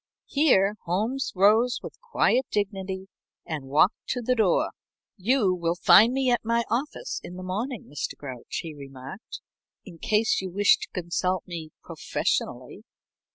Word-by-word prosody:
Here 215 -9 +3
Holmes 220 +10 -1
rose 220 +6 +4
with - - -9
quiet 265 - +1
dignity 195 -2 -3 0.4
and 150 -4 -5
walked 150 - +2
to 245 - -2
the 255 - +2
door. 215 -7 +2 0.4
"You 210 -1 +2
will 170 -1 -1
find 215 +5 +7
me 265 -1 +1
at 240 - +1
my 235 +1 +1
office 280 - -2
in 180 - -8
the 185 - -7
morning, 215 +6 -3
Mr. 145 - -5
Grouch." 130 -4 -6
he 165 -2 -7
remarked, 135 - -10 0.4
"in 175 -5 -12
case 215 +3 +2
you 190 - -4
wish 205 +3 +4
to - - -6
consult 180 +1 -1
me 165 -3 -7
professionally." - - -3
195 Hz, 150 wpm, -26 LUFS, 175-235 Hz, 0.4 s, find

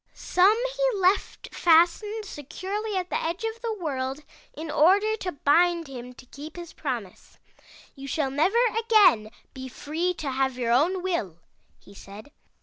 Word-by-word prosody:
Some 390 +5 +3 0.2
he - - 0
left 375 +2 0
fastened 350 +6 +3
securely 395 +6 -5
at 365 -1 -4
the - - -1
edge 340 +6 -3
of 450 +1 -4
the 465 -2 -2
world 270 -3 -3 0.3
in 315 +1 -7
order 400 +9 +4
to 365 -3 -4
bind 335 +3 +2
him 250 -2 -9
to 250 - -15
keep 290 +5 -11
his 345 -2 -9
promise. - - -6 0.3
" - - -22
'You 275 -1 -9
shall 275 -1 -1
never 320 - +1 0.2
again 410 - +4 0.2
be 260 0 -8
free 325 +7 -3
to 285 -4 -4
have 265 -1 -1
your 235 -2 -1
own 345 +9 +2
will,' 280 - -2 0.4
he 200 - -18
said. 200 +6 -12
330 Hz, 160 wpm, -25 LUFS, 270-385 Hz, 0.4 s, order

